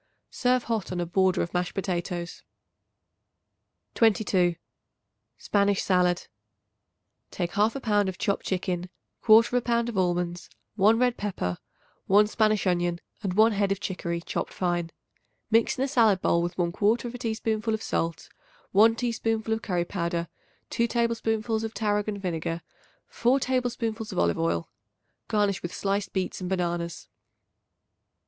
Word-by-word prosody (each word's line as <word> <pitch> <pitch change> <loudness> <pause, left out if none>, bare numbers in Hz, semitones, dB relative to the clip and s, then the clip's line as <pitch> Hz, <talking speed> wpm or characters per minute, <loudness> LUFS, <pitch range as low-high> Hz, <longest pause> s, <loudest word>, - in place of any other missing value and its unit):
Serve 250 -1 +1
hot 220 -6 -2
on 180 - -3
a 175 - 0
border 185 +2 +2
of 170 - -6
mashed 180 0 -1
potatoes. 180 -2 -3 1.5
22. 195 -6 +3 0.8
Spanish 200 -1 +1
Salad. 180 -2 +2 1.0
Take 175 -2 -3
1/2 215 +6 +1
pound 205 -3 +2
of 185 - -6
chopped 200 -2 -1
chicken, 180 -1 -2 0.4
1/4 230 +2 +6
pound 235 -1 +1
of 210 -5 -2
almonds, 175 -1 -1 0.2
1 215 +2 +4
red 245 0 +2
pepper, 180 - -3 0.5
1 205 +2 +6
Spanish 215 -1 +1
onion 175 -1 +1 0.2
and 190 -3 -2
1 220 +2 +6
head 200 -1 0
of 195 - 0
chicory 170 -4 -3
chopped - - -4
fine. 175 -2 -1 0.6
Mix 225 +1 +3
in 260 - 0
a - - +1
salad 225 -8 +4
bowl 170 -1 +2
with 175 0 -3
1/4 215 +7 0
teaspoonful 220 -1 -1
of 220 - -7
salt, 165 0 -2 0.4
1 220 +3 +5
teaspoonful 225 -2 -1
of 220 - -2
curry 175 -5 -1
powder, 170 -2 -2 0.4
2 235 - +1
tablespoonfuls 225 -1 0
of 225 0 -5
tarragon 210 -1 0
vinegar, 170 -3 -3 0.4
4 255 +3 +2
tablespoonfuls 240 -4 -2
of - - -6
olive 85 0 +2
oil. 85 0 -1 0.6
Garnish 205 -3 +1
with 175 - -5
sliced 200 +1 -2
beets 190 0 -3
and 180 - -3
bananas. 175 -2 -2
200 Hz, 140 wpm, -27 LUFS, 175-225 Hz, 1.5 s, 1/4